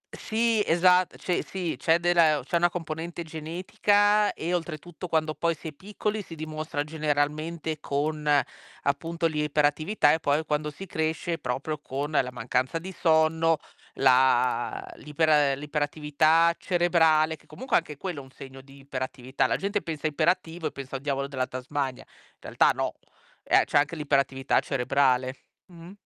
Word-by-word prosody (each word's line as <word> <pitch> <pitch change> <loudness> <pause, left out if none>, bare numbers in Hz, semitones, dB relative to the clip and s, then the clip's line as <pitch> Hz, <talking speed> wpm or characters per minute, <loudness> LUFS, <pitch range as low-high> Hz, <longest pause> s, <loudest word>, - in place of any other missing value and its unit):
Sì, 225 -1 +1
esatt 180 +1 +3
cioè 180 - -1
sì 180 -4 -4
c'è 165 0 +3
della 175 -1 +4
e 155 - +4
o 140 - -4
c'è 170 - 0
una 175 +1 +3
componente 170 0 -5
genetica 205 +6 +1
e 170 +3 -3
oltretutto 175 +1 -4
quando 155 -1 0
poi 170 0 0
si 160 - -7
è - - -9
piccoli 210 +5 -4
si 165 -4 -10
dimostra 155 -1 -4
generalmente 155 +1 -2
con 150 +1 -2 0.5
appunto 165 +4 -1
l'iperattività 150 +2 +2
e 160 - 0
poi 150 +2 +1
quando 150 0 -1
si 190 +7 -9
cresce 160 0 -2
proprio 145 +4 -3
con 145 +2 -4
la 130 -4 +1
mancanza 125 +5 -1
di 185 +3 -7
sonno, 160 -1 +3 0.4
la 125 -1 +2
l'iper 155 +2 -1
ehm, 145 -3 +4
l'iperattività 150 +3 +2
cerebrale, 160 -3 +3
che - - -25
comunque 260 +2 0
anche 150 -4 -4
quello 175 -5 -5
è - - -9
un 130 - -15
segno 135 0 -11
di 135 +1 -17
iperattività. 130 -1 -2
La - - 0
gente 200 +1 -1
pensa 160 -2 -6
iperattivo 165 +2 0
e - - -5
pensa 135 0 -8
al - - -12
diavolo 140 -1 -2
della 130 -2 -2
Tasmania. 130 +1 -4
In - - -27
realtà - - +2
no, - - -1 0.5
ehm, - - +4
c'è 145 - +2
anche 150 +3 0
l'iperattività 140 -3 +1
cerebrale. 130 -1 +1 0.3
Mh. 170 0 -13
155 Hz, 160 wpm, -26 LUFS, 140-170 Hz, 0.5 s, della